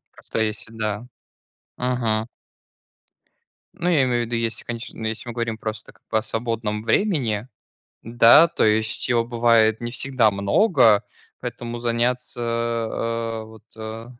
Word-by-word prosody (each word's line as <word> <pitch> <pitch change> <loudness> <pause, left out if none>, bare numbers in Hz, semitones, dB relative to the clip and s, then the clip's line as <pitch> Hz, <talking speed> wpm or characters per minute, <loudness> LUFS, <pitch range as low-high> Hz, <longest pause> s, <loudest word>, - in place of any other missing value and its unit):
Каста - - -5
есть 110 0 -1
всегда. 110 0 -4 0.7
Мгм. 120 -3 0 1.5
Ну, 175 - -2
я 155 -6 +4
имею 120 -2 +1
в - - -2
виду, 120 - -2
если 115 -1 -2
конеч 120 0 -5
если 110 +2 -4
мы 120 - -5
говорим 115 -2 -3
просто, 110 -1 -6
как - - -30
бы - - +3
о - - -5
свободном 110 -1 -3
времени, 120 - +1 0.6
да, 120 +7 +7
то - - 0
есть, 110 +2 +1
его 120 -1 +2
бывает 115 -2 +3
не 120 - -4
всегда 125 -3 +2
много, 110 - +3 0.4
поэтому 120 0 -5
заняться, 120 +1 -1
э, 115 -1 -2
вот, 110 0 -15
э, 110 +1 -7
115 Hz, 140 wpm, -23 LUFS, 110-120 Hz, 1.5 s, да